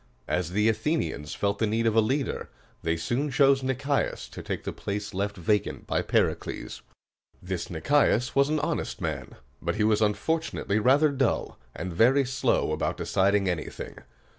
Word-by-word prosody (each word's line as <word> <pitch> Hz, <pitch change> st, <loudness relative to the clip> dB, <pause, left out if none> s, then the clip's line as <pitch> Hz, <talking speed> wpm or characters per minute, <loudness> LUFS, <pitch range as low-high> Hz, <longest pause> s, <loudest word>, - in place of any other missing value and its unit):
As 90 Hz, -2 st, 0 dB
the 105 Hz, +2 st, +3 dB
Athenians 110 Hz, -, -1 dB
felt 100 Hz, 0 st, -1 dB
the 110 Hz, -, +2 dB
need 115 Hz, +2 st, 0 dB
of 115 Hz, -1 st, +2 dB
a 115 Hz, -, +6 dB
leader, 135 Hz, +6 st, -1 dB, 0.3 s
they 80 Hz, 0 st, 0 dB
soon 125 Hz, -, -1 dB
chose 135 Hz, 0 st, +4 dB
Nic´ias 135 Hz, +2 st, -1 dB
to -, -, -7 dB
take -, -, -4 dB
the -, -, -4 dB
place 105 Hz, +1 st, -4 dB
left 100 Hz, +2 st, -2 dB
vacant 105 Hz, +3 st, 0 dB
by -, -, 0 dB
Pericles. -, -, -1 dB, 0.6 s
This 90 Hz, -1 st, -4 dB
Nicias 125 Hz, -, +2 dB
was 140 Hz, +1 st, +4 dB
an 155 Hz, 0 st, +1 dB
honest -, -, -2 dB
man; -, -, -4 dB, 0.3 s
but -, -, -1 dB
he 105 Hz, -, +1 dB
was 110 Hz, 0 st, +3 dB
unfortunately 110 Hz, 0 st, 0 dB
rather 140 Hz, +7 st, +5 dB
dull, 135 Hz, -3 st, -1 dB, 0.2 s
and 90 Hz, 0 st, -4 dB
very 130 Hz, +9 st, +4 dB
slow 130 Hz, +1 st, +1 dB
about -, -, -1 dB
deciding 100 Hz, 0 st, +2 dB
anything. 85 Hz, -4 st, -4 dB
110 Hz, 165 wpm, -27 LUFS, 100-135 Hz, 0.6 s, a